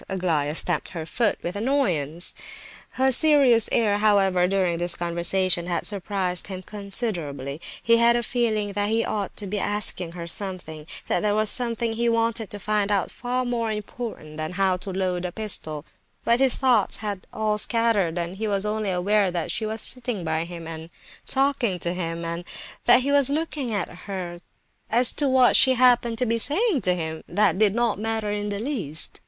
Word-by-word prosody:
Aglaya 165 -6 -1
stamped 175 -1 +2
her 165 -3 -6
foot 225 +6 0
with 175 - -4
annoyance. 185 - 0 0.6
Her 265 +1 +2
serious 265 -5 +5
air, 205 -3 +2
however, 195 -4 +3
during 180 -3 0
this 175 0 +1
conversation 175 +1 +1
had 175 - -2
surprised 190 -3 0
him 185 -2 -7
considerably. 175 - -1 0.2
He 230 0 +5
had 235 +1 +4
a 240 - 0
feeling 220 -4 -1
that 205 +1 -1
he 225 +1 +1
ought 205 -2 -4
to 205 - -3
be 200 +1 -3
asking 195 -5 0
her 170 -1 -7
something, 170 -4 -5 0.2
that - - +1
there 210 -1 0
was 215 -1 +2
something 235 -2 0
he 235 +1 0
wanted 230 -1 0
to 205 - -6
find 210 0 -1
out 200 -3 0
far 250 +1 -3
more 235 -2 -1
important 210 -7 -7
than 155 +2 -4
how 190 0 +1
to 190 - -8
load 185 -1 -2
a 180 - -3
pistol; 160 -8 -3 0.4
but 235 +1 +3
his 265 -2 +4
thoughts 250 -6 +2
had 200 -3 -5
all 215 -1 -1
scattered, 215 -7 +1
and 175 +2 -4
he 220 +1 -2
was 200 -1 -1
only 210 -1 -2
aware 195 +2 +1
that 175 -2 -3
she 215 -1 -3
was 220 0 -4
sitting 240 -6 -1
by 160 0 -1
him, 170 -1 -8
and 160 0 -8 0.4
talking 270 -7 +1
to 175 0 -2
him, 170 -2 -4
and 170 +1 -4 0.4
that 250 - +6
he 280 +2 0
was 280 -2 +4
looking 295 -4 -2
at 205 -4 -1
her; 180 -1 -7 0.5
as 240 +2 +3
to 285 -2 0
what 260 -1 +4
she 260 -1 +6
happened 245 -2 +3
to 250 - +1
be 230 0 0
saying 330 - +3
to 180 -2 +2
him, 160 -2 -4
that 195 +1 +1
did 210 -1 +3
not 235 -3 0
matter 220 -1 -2
in 205 0 -3
the 200 - -3
least. 200 - -2
205 Hz, 190 wpm, -24 LUFS, 180-230 Hz, 0.6 s, that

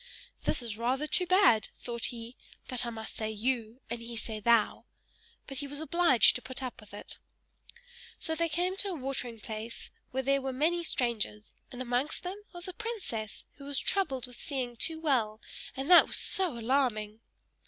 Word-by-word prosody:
"This - - +1
is 225 -2 -4
rather 260 +5 +1
too 360 +4 +2
bad," 365 - +5
thought 235 -1 -1
he, 235 0 -4 0.3
"that 250 -1 0
I - - -1
must 220 -1 -6
say 220 -1 -2
YOU 230 +2 -1
and 235 0 -4
he 230 0 -6
say 215 0 -2
THOU," 230 0 +3 0.6
but 270 - -7
he 285 - -3
was 285 +1 -6
now 310 - -3
obliged 340 -7 +5
to 250 - -2
put 260 +3 -5
up 255 -2 -5
with 210 - -16
it. 205 - -9 1.0
So 320 - +1
they 335 +1 +1
came 355 +4 +1
to 405 - +3
a 375 - -2
watering 255 -5 -3
place 220 +2 -6 0.2
where 265 +1 -2
there 275 +1 +3
were 265 0 -2
many 330 +6 +1
strangers, 230 -7 0 0.2
and 250 0 -5
amongst 250 +5 -1
them 365 +2 -4
was 350 0 -8
a 370 - -5
princess, 375 - -5
who 280 - -10
was 285 -1 -3
troubled 275 -11 0
with 250 -1 -13
seeing 255 -5 -2
too 320 +7 -1
well; 240 -9 +1 0.4
and 270 +1 -3
that 350 - +10
was - - 0
so 370 - +1
alarming! 225 -3 +1
255 Hz, 190 wpm, -31 LUFS, 230-310 Hz, 1.0 s, that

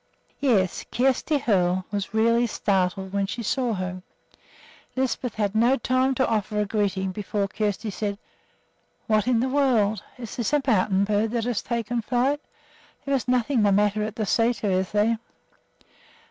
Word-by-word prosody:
Yes, 210 -10 +1
Kjersti 270 +4 +1
Hoel 185 -5 +1
was 200 -4 -3
really 230 +2 +3
startled 190 -2 -1
when 200 -1 0
she 235 +4 -4
saw 240 0 0
her. 185 -1 -4 0.9
Lisbeth 260 -2 -1
had 205 -2 -1
no 235 +5 +3
time 260 +1 +1
to 260 - +2
offer 215 -1 -1
a 210 - +1
greeting 195 -2 -1
before 200 +1 -2
Kjersti 210 +1 -2
said: 200 -1 -3 0.9
"What 215 -1 +1
in 240 -2 +3
the 260 - +1
world! 240 -8 +2 0.2
Is 235 -3 -8
this 240 +3 -1
a 295 - +4
mountain 200 -5 +2
bird 210 +2 +1
that 230 0 -1
has 240 -2 -1
taken 235 0 -2
flight? 260 +5 0 0.6
There 280 - -1
is 265 -2 0
nothing 250 0 +2
the 205 -1 +4
matter 205 +1 +2
at 215 0 -3
the 220 - -2
sæter, 225 0 +1
is 185 0 0
there?" 220 +2 +2
220 Hz, 160 wpm, -25 LUFS, 200-245 Hz, 0.9 s, a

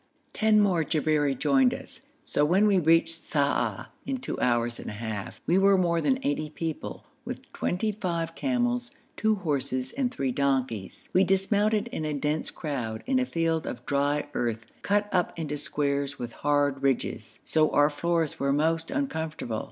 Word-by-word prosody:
Ten 215 -1 +4
more 185 -6 +3
Jabberi 150 -2 +1
joined 135 -3 +3
us, - - -11 0.2
so 145 - +1
when 185 +7 +4
we 200 -3 +4
reached 165 0 +3
Sa'ah 145 -2 0
in 270 -1 -2
two 260 - -5
hours 120 -1 +1
and - - -6
a - - -6
half, 105 -2 -5
we 180 +3 +3
were 195 0 +5
more 170 -2 +2
than 260 +6 +2
eighty 150 +1 -1
people, 160 0 -5 0.2
with - - -8
twenty 215 +5 -1
five 170 -5 -3
camels, 245 +1 0 0.3
two 220 0 +2
horses, 140 -8 -2
and 260 -3 -1
three 135 - -1
donkeys. 130 -7 -1
We 185 - +5
dismounted 205 +3 +2
in 160 - -4
a 155 -1 -1
dense 150 +2 -1
crowd, 125 -9 -4
in 260 0 +2
a 255 - 0
field 165 -3 0
of 120 0 -6
dry 145 +1 +1
earth 115 -2 -2 0.2
cut 205 +1 +1
up 180 -2 0
into 150 -3 -3
squares 140 -2 -1
with 120 -1 -5
hard 145 0 +1
ridges, 135 -3 -1
so 155 -1 +3
our 145 +1 +4
floors 165 +1 0
were 140 0 +1
most 160 +3 +1
uncomfortable. 160 - -2
155 Hz, 170 wpm, -27 LUFS, 140-190 Hz, 0.3 s, were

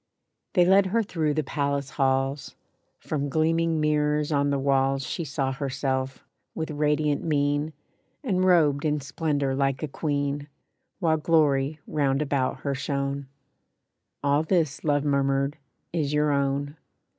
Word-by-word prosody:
They 180 -3 +5
led 190 +1 +5
her 225 +4 +1
through 155 -6 -1
the 155 - +1
Palace 140 0 -2
halls; 135 0 0 0.4
From 145 -2 -3
gleaming 165 +2 +1
mirrors 150 0 +1
on 145 -1 +2
the 140 - +1
walls 135 0 +1
She 170 - -3
saw 135 -2 -2
herself, 135 -1 -3 0.3
with 160 -1 -3
radiant 150 -1 +1
mien, 145 0 0 0.5
And 185 -8 +1
robed 155 -6 +4
in 150 -1 +1
splendor 140 0 -1
like 135 +1 0
a - - 0
queen, 145 0 -2 0.5
While 165 -4 +2
glory 150 -2 +2
round 140 -1 +1
about 135 -3 -1
her 140 - -1
shone. 140 0 -2 1.0
"All 145 +1 +3
this," 160 -3 0
Love 145 -2 +2
murmured, 140 +1 +1 0.3
"is 150 -4 -1
your 150 0 +2
own." 140 +1 -1
145 Hz, 135 wpm, -26 LUFS, 140-155 Hz, 1.0 s, They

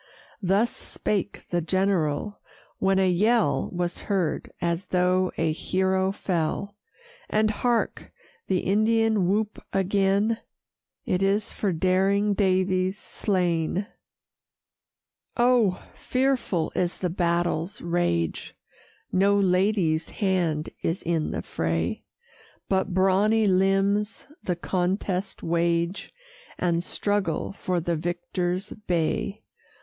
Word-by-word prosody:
Thus 200 +5 +2
spake 205 -1 -3
the 175 -1 +1
general; 185 +1 0 0.4
when 195 0 +2
a 190 -1 +3
yell 215 +6 +2
Was 175 -1 -2
heard, 185 -6 0
as 170 +1 -1
though 180 0 +2
a 165 -1 +1
hero 190 +3 0
fell. 190 +1 -2 0.5
And, 215 0 +2
hark! 235 +2 -1 0.4
the 185 - +1
Indian 220 -1 +2
whoop 210 +1 -1
again 200 +3 +2 0.7
It 180 - 0
is 200 +3 +1
for 200 - -1
daring 190 +4 +2
Daviess 185 -1 +1
slain! 180 -2 -1 1.5
Oh! 240 -6 +3
fearful 255 -10 0
is 175 -1 -1
the 180 -2 -2
battle's 175 +1 0
rage; 170 - -1 0.6
No 195 +2 +3
lady's 185 -4 +2
hand 175 -7 0
is 165 +4 -2
in 165 -2 0
the - - -3
fray; 80 +1 -2 0.6
But 190 0 +1
brawny 195 +4 +3
limbs 195 +2 +2 0.2
the 180 - -1
contest 185 +2 -2
wage, 170 +2 0 0.5
And 170 -1 +1
struggle 200 -5 -1
for 185 -2 -2
the 170 0 -1
victor's 175 +3 -2
bay. 195 +2 -2
190 Hz, 105 wpm, -26 LUFS, 175-200 Hz, 1.5 s, a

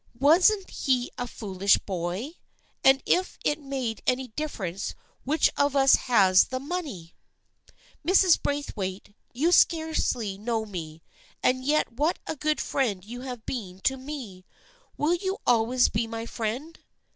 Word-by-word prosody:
Wasn't 365 +8 +4
he 255 -2 0
a 245 - -2
foolish 200 -3 +1
boy? 185 - -4 0.5
As 270 0 +7
if 370 +1 +1
it 295 +1 +1
made 265 -6 -4
any 255 0 0
difference 210 - -4 0.3
which 300 +3 +2
of 285 0 +2
us 270 -1 +5
has 195 -7 +5
the 255 0 -4
money! 275 - -5 0.9
Mrs. 370 +1 +4
Braithwaite, 205 -9 -4 0.2
you 305 +8 +1
scarcely 315 - +2
know 220 0 -2
me, 165 -5 -8 0.4
and 255 0 +2
yet 295 -1 +1
what 300 +8 0
a - - -4
good 305 +1 0
friend 210 -9 -1
you 240 +3 -8
have 250 -3 -7
been 190 -8 -5
to 265 - +1
me! 260 -9 -8 0.5
Will 305 +4 +2
you 380 +3 -2
always 245 +1 +3
be 225 +1 -1
my 225 0 -5
friend? 240 +9 -4
255 Hz, 140 wpm, -26 LUFS, 210-295 Hz, 0.9 s, As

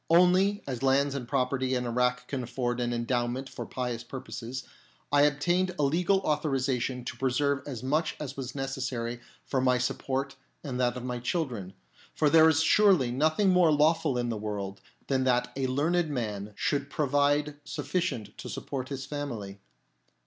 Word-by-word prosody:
Only, 180 +4 +4
as 130 -3 -4
lands 135 +1 +3
and 130 -4 -4
property 130 0 0
in 125 0 -1
Irak 125 +1 0
can 135 -2 -3
afford 120 0 -2
an 120 0 0
endowment 120 +2 -1
for - - -7
pious 125 -2 -3
purposes, 125 0 -6 0.5
I 145 0 +5
obtained 175 +6 +1
a 150 - +1
legal 180 +7 +2
authorisation 135 -5 0
to - - -5
preserve 140 +2 +1
as 130 -5 -5
much 150 +5 0
as 140 -3 -5
was 130 -1 -6
necessary 130 -3 -3 0.3
for 130 - 0
my 125 -1 +3
support 135 +2 -2 0.3
and 130 -4 -4
that 125 -1 +1
of 125 - -6
my 125 -1 -3
children; 120 - -2 0.4
for 150 -2 +3
there 160 0 +7
is 160 0 +3
surely 185 -10 +5
nothing 155 +9 +2
more 180 -3 +5
lawful 155 -2 +3
in 120 -1 -1
the 115 - -2
world 100 -2 -4 0.2
than 135 -1 +1
that 125 -1 +2
a 135 -1 0
learned 160 +6 +1
man 105 -6 -3
should 140 +3 -1
provide 145 +1 +1
sufficient 135 - -3
to - - -6
support 130 -2 -5
his 135 -1 -4
family. 115 -10 -5
135 Hz, 165 wpm, -29 LUFS, 125-150 Hz, 0.5 s, there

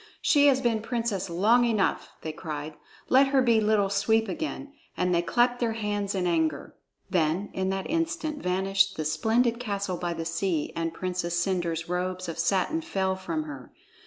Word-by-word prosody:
She 290 -1 +5
has 265 -2 +4
been 230 -3 +1
princess 225 -5 -2
long 215 +8 +4
enough!" 225 -4 +1
they 160 - -3
cried. 155 -1 -6 0.3
"Let 270 +2 +5
her 270 0 +3
be 230 -3 +4
Little 210 -2 +2
Sweep 220 +3 +2
again," 305 -3 -5 0.2
and 180 0 +1
they 170 - +3
clapped 245 +6 +2
their 230 -2 0
hands 205 -2 -2
in 185 -2 0
anger. 160 -4 0 0.4
Then 175 +3 +1
in 190 0 -1
that 190 0 -2
instant 325 -2 -2
vanished 195 +1 +1
the 155 - -2
splendid 225 +10 +1
castle 200 -6 -2
by 175 -1 -2
the 165 - -4
sea, 170 -1 -1
and 165 0 -1
Princess 175 0 -3
Cendre's 175 -3 -1
robes 180 +1 -2
of 165 -1 -5
satin 195 - +1
fell 190 - -1
from 170 -4 -3
her. 140 -4 -9
195 Hz, 175 wpm, -27 LUFS, 170-230 Hz, 0.4 s, She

